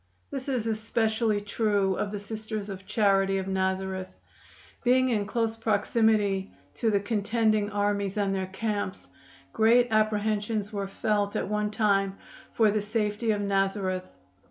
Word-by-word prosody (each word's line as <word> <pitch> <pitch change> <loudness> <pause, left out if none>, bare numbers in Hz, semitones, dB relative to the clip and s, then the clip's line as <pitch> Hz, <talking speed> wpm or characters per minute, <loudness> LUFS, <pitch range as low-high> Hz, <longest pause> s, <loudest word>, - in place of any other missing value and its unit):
This 270 0 -4
is 250 -4 -1
especially 220 -1 0
true 205 -2 +1
of 200 - -2
the 205 - -4
Sisters 215 0 -5
of 195 -1 -8
Charity 195 -2 +2
of 190 0 -3
Nazareth. 190 0 -1 0.8
Being 255 +1 +4
in 210 -4 0
close 225 0 -1
proximity 210 -2 +1 0.2
to 230 - 0
the 205 -2 +3
contending 215 0 +1
armies 205 -1 -1
and 200 -1 +1
their 190 -1 -2
camps, 205 0 -3 0.5
great 235 +2 +4
apprehensions 215 0 0
were 200 -1 -2
felt 205 0 -1
at - - -1
one 210 0 0
time 200 -2 +1 0.3
for 220 -2 +3
the 210 0 0
safety 210 +1 -1
of 210 -1 +1
Nazareth. 195 -2 0
210 Hz, 140 wpm, -27 LUFS, 195-220 Hz, 0.8 s, Being